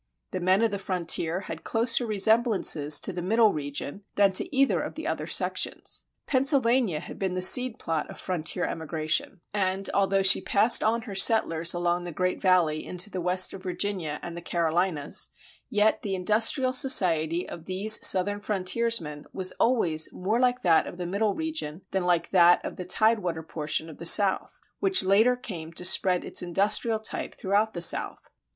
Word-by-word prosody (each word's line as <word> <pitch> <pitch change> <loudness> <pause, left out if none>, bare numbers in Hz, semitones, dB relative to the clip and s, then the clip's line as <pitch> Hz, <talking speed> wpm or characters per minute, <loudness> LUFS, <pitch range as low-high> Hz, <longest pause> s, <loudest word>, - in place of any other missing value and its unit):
The 185 - -4
men 185 +4 +1
of 225 - +1
the 200 - -4
frontier 180 -2 0
had - - -9
closer 230 +1 +1
resemblances 205 - +2
to 195 - -3
the 175 - -5
Middle 215 +3 +2
region 145 +4 -6
than 200 -1 +3
to 190 +8 +1
either 275 0 +2
of - - -7
the - - -8
other - - -4
sections. - - -1 0.2
Pennsylvania 255 - +1
had - - -11
been 190 -2 -3
the 185 - -3
seed 250 +5 +5
plot 160 -2 -4
of - - -11
frontier 180 0 -3
emigration, 160 +2 -3
and, 195 -1 -1
although 195 0 +1
she 190 - +6
passed 220 +4 +3
on 230 +1 -1
her 215 -4 -9
settlers 175 -5 +2
along 175 0 -1
the 175 - -5
Great 180 +3 -3
Valley 175 -5 +1
into 180 +3 -4
the 185 - -5
west 180 +1 +1
of 195 - -10
Virginia 180 -4 -4
and 170 - -7
the 170 - -7
Carolinas, 170 -2 -1 0.4
yet 210 +1 +1
the 200 -5 -4
industrial 225 +7 +1
society 175 - +3
of 165 - -10
these 200 +4 +2
Southern 200 +2 +3
frontiersmen 195 -6 -2
was 185 -1 -2
always 175 -11 +1
more 210 +6 -2
like 250 0 0
that 165 -3 +2
of - - -10
the 180 - -5
Middle 200 +3 -2
region 310 - -4
than 190 -2 -2
like 175 -1 0
that 175 -2 +4
of - - -7
the 180 - -7
tide 220 +5 +2
water 170 -4 -5
portion 155 0 -4
of 160 - -13
the 170 - 0
South, 200 +2 +3 0.2
which 390 -1 +2
later 215 +6 +3
came 175 -10 -8
to 180 - -1
spread 180 -1 +3
its - - 0
industrial 200 +5 -1
type 220 - -5
throughout 205 +2 -1
the 170 - -5
South. - - 0
185 Hz, 180 wpm, -25 LUFS, 170-220 Hz, 0.4 s, she